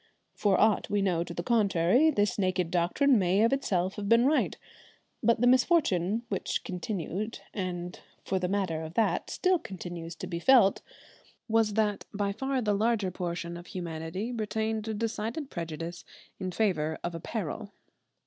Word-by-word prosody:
For 200 -3 +2
aught 220 -1 +3
we 205 -1 +1
know 175 -3 +1
to 175 - -9
the 170 0 -4
contrary, 215 - +3
this 205 -7 +1
naked 185 -3 0
doctrine 210 +9 +3
may 190 +3 +3
of 230 - +3
itself 190 -9 0
have 200 -1 -3
been 230 +2 +5
right, 300 +3 +2 0.6
but 235 0 +3
the - - +4
misfortune 240 - +3
which 200 -4 -2
continued, 190 +3 -4
and 180 -2 -4 0.3
for 190 - 0
the 180 - -1
matter 185 -5 -1
of 160 +1 -7
that 225 - +1
still 370 -1 +2
continues, 175 - -7
to - - -6
be 170 -2 -4
felt, 230 -2 +5 0.7
was 220 -2 +2
that 210 -2 +1
by 200 0 0
far 265 +4 -1
the 210 -1 +2
larger 210 -2 +1
portion 170 -1 -4
of 175 +1 -9
humanity 170 +5 -4
retained 220 -1 -2
a 220 - -2
decided 225 +6 -3
prejudice 165 +1 -5 0.4
in 185 -1 -3
favour 160 -7 0
of 175 - -3
apparel. 200 +3 -4
200 Hz, 160 wpm, -29 LUFS, 175-225 Hz, 0.7 s, been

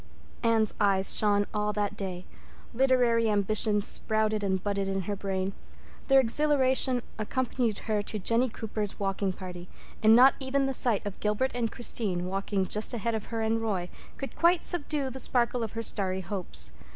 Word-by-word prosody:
Anne's 225 -2 +2
eyes 195 -2 +5
shone 205 -1 +2
all 210 0 0
that 205 0 -2
day; 185 -3 -6 0.5
literary 240 -3 +2
ambitions 210 0 +2
sprouted 215 -1 0
and 190 -1 -1
budded 200 -1 -1
in 195 0 -1
her 205 +3 -4
brain; 195 -1 -3 0.5
their 270 -1 +6
exhilaration 260 -1 +2 0.2
accompanied 240 -1 -1
her 215 -2 +1
to 215 +1 -5
Jennie 230 +6 +2
Cooper's 215 -2 -4
walking 195 -1 -1
party, 180 -1 -9 0.3
and 220 +1 +6
not 255 +3 +7
even 270 0 0
the 270 - -1
sight 240 -5 +1
of 200 -1 -6
Gilbert 210 +5 0
and 235 -2 -2
Christine, 200 -7 -2
walking 195 +1 -2
just 215 +5 0
ahead 230 +1 -2
of 220 -2 -3
her 225 -1 -4
and 225 +1 0
Roy, 190 -5 -2 0.3
could 275 - -7
quite 340 0 +3
subdue 295 -5 -1
the 265 - -7
sparkle 245 -1 +1
of 225 -2 -4
her 230 0 -4
starry 190 -3 0
hopes. 170 - -2
215 Hz, 170 wpm, -28 LUFS, 195-245 Hz, 0.5 s, not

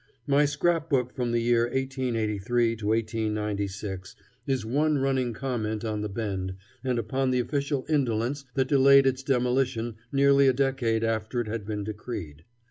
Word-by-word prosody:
My 145 +1 +4
scrap 160 +2 0
book 125 -4 +1
from 120 -2 -2
the 120 0 +1
year 120 0 +3
1883 120 -3 0
to 105 -1 -5
1896 105 -3 -2 0.3
is 130 -5 0
one 150 +6 +1
running 135 -2 0
comment 110 -3 -3
on 105 -1 -2
the 105 - -3
Bend 95 -3 -3 0.3
and 130 -2 0
upon 130 +3 0
the 125 -1 +2
official 140 +1 -1
indolence 135 -2 0
that 130 -1 +2
delayed 140 0 +6
its 135 0 +1
demolition 125 -3 0
nearly 140 0 +5
a 130 - +5
decade 125 -4 0
after 115 +1 -1
it 120 - -2
had 105 -2 -4
been 105 -2 -3
decreed. 100 -8 -7
120 Hz, 155 wpm, -27 LUFS, 110-135 Hz, 0.3 s, delayed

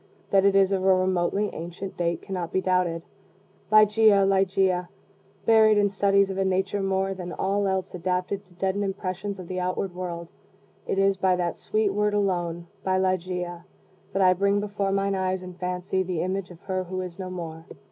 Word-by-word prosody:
That 195 0 +4
it 200 0 +4
is 195 0 +4
of 190 -1 0
a 190 0 +5
remotely 185 +2 0
ancient 175 +3 -7
date 170 -1 -1
cannot 180 -3 -4
be - - +1
doubted. 180 -3 0 0.7
Ligeia! 215 -1 +6
Ligeia! 190 -2 +2 0.6
Buried 220 -1 +6
in 205 -1 +3
studies 200 0 +3
of 190 - -4
a - - +3
nature 190 +1 0
more 195 0 0
than 180 -2 -7
all 200 +2 0
else 190 0 -2
adapted 180 +2 -2
to 180 - -23
deaden 190 +2 -1
impressions 195 0 -3
of 185 -2 -9
the 185 +1 -3
outward 185 +1 -2
world, 170 -2 -5 0.6
it - - -1
is 195 0 +3
by 185 -1 +2
that 175 -1 -1
sweet 215 -2 0
word 210 0 +1
alone 175 -4 -1 0.2
by 185 0 +1
Ligeia 180 -2 -2 0.5
that 195 - +1
I 185 0 +6
bring 200 +2 +2
before 205 -1 -2
mine 195 0 +1
eyes 185 -1 -1
in 180 0 -8
fancy 180 +1 -2
the 180 -3 -2
image 185 0 -2
of 175 -2 -13
her 185 -1 -3
who 185 +1 -4
is 180 0 -7
no 185 -1 -4
more. 165 -2 -7
190 Hz, 190 wpm, -26 LUFS, 180-195 Hz, 0.7 s, Ligeia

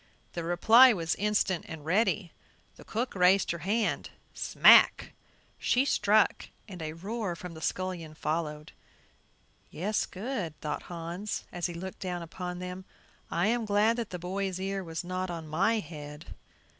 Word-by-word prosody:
The 170 - -4
reply 225 +9 +7
was 165 -4 -1
instant 205 -3 0
and 160 -3 -8
ready. 195 0 +1 0.4
The - - -14
cook 240 +3 -3
raised 185 +1 +4
her 170 - -4
hand; 210 +7 -1 0.2
"smack!" - - +5 0.5
she 255 +2 +2
struck 215 -5 +2 0.2
and 185 -5 -9
a 155 -1 -4
roar 195 +2 -4
from 175 0 -8
the 160 - -10
scullion 175 -3 -3
followed. 150 -1 -3 1.0
"Yes, 205 +6 -1
good," 195 - -5
thought 150 -1 -3
Hans, 175 +4 -4
as 175 0 -2
he 175 - -7
looked 190 +2 -7
down 180 -2 -4
upon 180 +2 -6
them; 180 +1 -6 0.5
"I 170 +3 +1
am 240 0 +1
glad 210 +2 +3
that 235 -3 -3
the 180 - -5
boy's 185 +1 -3
ear 195 0 -2
was 165 -1 -5
not 185 +1 -3
on 165 -2 -6
my 190 +9 +2
head." 150 -2 -9
180 Hz, 155 wpm, -29 LUFS, 165-205 Hz, 1.0 s, reply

